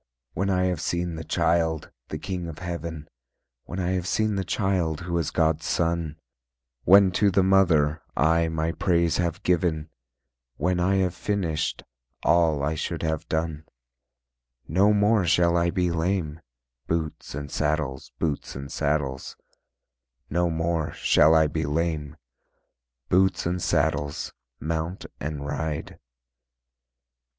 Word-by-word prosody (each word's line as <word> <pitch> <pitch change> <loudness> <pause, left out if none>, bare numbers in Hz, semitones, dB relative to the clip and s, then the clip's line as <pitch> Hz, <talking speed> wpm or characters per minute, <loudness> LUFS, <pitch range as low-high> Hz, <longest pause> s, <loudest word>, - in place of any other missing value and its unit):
When 95 +1 -1
I 90 -1 +2
have 90 -4 0
seen 85 0 -1
The 80 0 -5
Child, 80 -2 0 0.2
the - - -4
King 90 -3 -4
of 80 -2 -7
Heaven, 85 -3 -5 0.6
When - - -6
I 90 0 0
have 90 -1 -1
seen 110 +2 +1
The 95 -1 -1
Child 90 -5 0
who 85 0 -3
is 80 - -1
God's 80 -1 +1
son, 85 -2 0 0.7
When 95 0 +7
to 100 +2 +3
the 95 0 +3
mother, 85 -6 +3 0.2
I 80 +2 +3
my 80 0 -1
praise 85 -2 +1
have 85 -2 -1
given, 80 -3 0 0.6
When 90 +4 0
I 95 +2 +2
have 95 -2 +1
finished, 85 -5 -2 0.4
All 80 -4 +3
I 75 +2 0
should 80 - -3
have 80 -1 -2
done: 80 -1 -2 1.0
No 95 +7 +4
more 105 0 +3
shall 85 0 +3
I 85 0 +2
be 90 -1 0
lame, 80 -2 -1 0.5
Boots 80 -4 -3
and 70 -1 -6
saddles, 75 -3 -1
boots 75 -4 -2
and 70 +1 -7
saddles, 70 -3 -1 1.0
No 85 +2 +2
more 80 0 -1
shall 80 +2 +4
I 80 -1 +5
be 75 -1 -2
lame, 75 -1 -2 0.9
Boots 95 0 +3
and 90 +1 -1
saddles, 75 -2 0 0.3
mount 80 +3 -3
and 75 -1 -4
ride. 75 +1 -4
85 Hz, 135 wpm, -25 LUFS, 80-90 Hz, 1.0 s, When